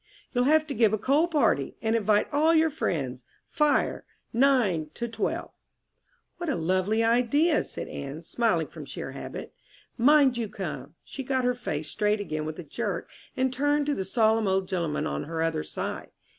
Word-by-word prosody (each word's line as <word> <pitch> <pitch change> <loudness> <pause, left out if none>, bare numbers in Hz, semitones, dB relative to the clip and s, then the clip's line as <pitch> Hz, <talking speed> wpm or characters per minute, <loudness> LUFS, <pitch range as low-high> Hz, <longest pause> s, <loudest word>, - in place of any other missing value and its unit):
"You'll 245 -1 +2
have 310 +2 +4
to 295 - -4
give 220 -3 +3
a - - +2
coal 285 +10 +2
party, 260 - +1
and 220 0 0
invite 210 -1 +2
all 315 +3 +4
your 320 0 +4
friends. 135 - -2 0.3
'Fire, 300 -1 +1 0.3
9 225 - +3
12.'" 230 -2 -3 0.9
"What 345 -2 -3
a 280 - +1
lovely 185 +6 +1
idea!" 250 +8 +3
said - - -7
Anne, 140 +4 -6
smiling 175 -4 +1
from - - -10
sheer - - -6
habit. - - -7 0.5
"Mind 275 0 +5
you 225 -3 -2
come." 150 -7 -6
She 275 - -7
got 260 -1 0
her 250 - +3
face 155 -10 -4
straight 210 0 +1
again 155 -6 -3
with 155 0 -5
a 175 - -6
jerk 145 - -4 0.3
and 260 0 +1
turned 290 +2 +1
to 290 - +1
the 195 - -2
solemn 220 +2 +2
old 190 0 +1
gentleman 170 -5 -1
on 70 0 -3
her 160 +1 -2
other 165 -1 0
side. - - -5
225 Hz, 175 wpm, -27 LUFS, 165-275 Hz, 0.9 s, Mind